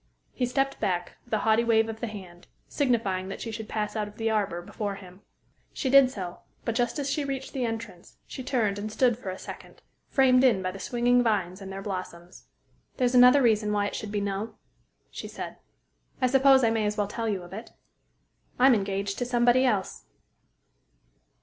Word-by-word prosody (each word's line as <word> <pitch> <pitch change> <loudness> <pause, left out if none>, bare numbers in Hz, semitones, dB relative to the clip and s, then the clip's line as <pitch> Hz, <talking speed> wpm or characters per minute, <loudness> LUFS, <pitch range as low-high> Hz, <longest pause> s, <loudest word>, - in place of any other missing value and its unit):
He 250 - -1
stepped 270 +2 -1
back, 180 -4 -2
with 240 - -11
a - - +2
haughty 220 +2 +3
wave 225 -1 +3
of 220 0 -6
the 235 - -3
hand, 185 -5 -10 0.2
signifying 220 -9 0
that 195 - -6
she 225 - -5
should 220 0 -7
pass 210 -1 -3
out 210 -1 -1
of 210 +1 -14
the 225 0 0
arbor 200 -5 0
before 205 +2 -4
him. 185 -1 -13 0.5
She 260 - -2
did 275 -2 +7
so; 185 -8 -7 0.3
but 230 - 0
just 240 +2 0
as 285 -2 -2
she 290 +1 -1
reached 270 -1 -5
the 260 -3 -1
entrance, 225 -6 -7
she - - -8
turned, 220 -6 0
and 215 +1 -5
stood 245 +1 +2
for 225 -5 -7
a 185 - -5
second, - - -11 0.2
framed 260 -2 +4
in 225 -8 +4
by 185 - -1
the 195 - -9
swinging 245 +3 +2
vines 200 -5 0
and 195 0 -7
their 195 0 -6
blossoms. 185 -3 -7 0.5
"There's 250 -2 +1
another 250 +2 +7
reason 215 -3 +2
why 205 -1 +1
it - - -4
should 215 - -5
be 205 -1 -1
'no,'" 200 +2 -3 0.6
she - - -7
said. - - -7 0.6
"I 255 - +2
suppose 270 +1 +5
I 225 - +4
may 220 -2 +1
as 210 +1 -2
well 205 - +1
tell 225 +2 -3
you 195 -4 -2
of 175 - -12
it. 220 +4 -8 0.9
I'm 260 +1 +6
engaged 200 -1 -1
to 245 - -1
somebody 245 +1 +3
else." 205 -7 -1
220 Hz, 200 wpm, -27 LUFS, 200-245 Hz, 0.9 s, did